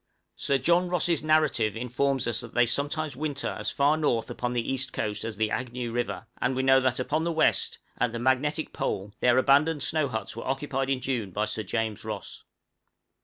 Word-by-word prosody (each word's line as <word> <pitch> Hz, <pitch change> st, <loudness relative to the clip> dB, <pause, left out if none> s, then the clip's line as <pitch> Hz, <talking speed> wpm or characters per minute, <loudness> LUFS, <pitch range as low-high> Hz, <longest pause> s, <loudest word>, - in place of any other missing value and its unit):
Sir 140 Hz, -, +1 dB
John 175 Hz, +6 st, +2 dB
Ross' 175 Hz, -2 st, +2 dB
'Narrative' 155 Hz, -9 st, +2 dB
informs 130 Hz, +3 st, 0 dB
us 115 Hz, -1 st, 0 dB
that -, -, -10 dB
they 120 Hz, -, +5 dB
sometimes 145 Hz, +3 st, -2 dB
winter 145 Hz, 0 st, -2 dB
as -, -, -3 dB
far 145 Hz, +2 st, +2 dB
north 120 Hz, -6 st, 0 dB
upon 120 Hz, 0 st, -2 dB
the 120 Hz, +2 st, -1 dB
east 135 Hz, +1 st, -3 dB
coast 105 Hz, -1 st, -2 dB
as 110 Hz, -2 st, -4 dB
the 110 Hz, 0 st, 0 dB
Agnew 125 Hz, -1 st, -3 dB
River; 120 Hz, +1 st, -2 dB, 0.2 s
and 130 Hz, -, +1 dB
we 130 Hz, -, 0 dB
know 135 Hz, 0 st, +6 dB
that 130 Hz, -1 st, 0 dB
upon 150 Hz, +5 st, 0 dB
the 170 Hz, -, 0 dB
west, 160 Hz, -1 st, +2 dB, 0.2 s
at 125 Hz, -1 st, +2 dB
the 120 Hz, -, -4 dB
magnetic 130 Hz, +5 st, 0 dB
pole, 100 Hz, +1 st, -3 dB
their 125 Hz, 0 st, +4 dB
abandoned 145 Hz, +3 st, +4 dB
snow 155 Hz, -2 st, +1 dB
huts 110 Hz, -4 st, -4 dB
were 115 Hz, -, -6 dB
occupied 135 Hz, 0 st, -1 dB
in 135 Hz, -2 st, 0 dB
June 120 Hz, -7 st, -2 dB
by 105 Hz, +4 st, -1 dB
Sir 110 Hz, -, -3 dB
James 110 Hz, -1 st, -2 dB
Ross. -, -, -6 dB
130 Hz, 200 wpm, -27 LUFS, 120-145 Hz, 0.2 s, know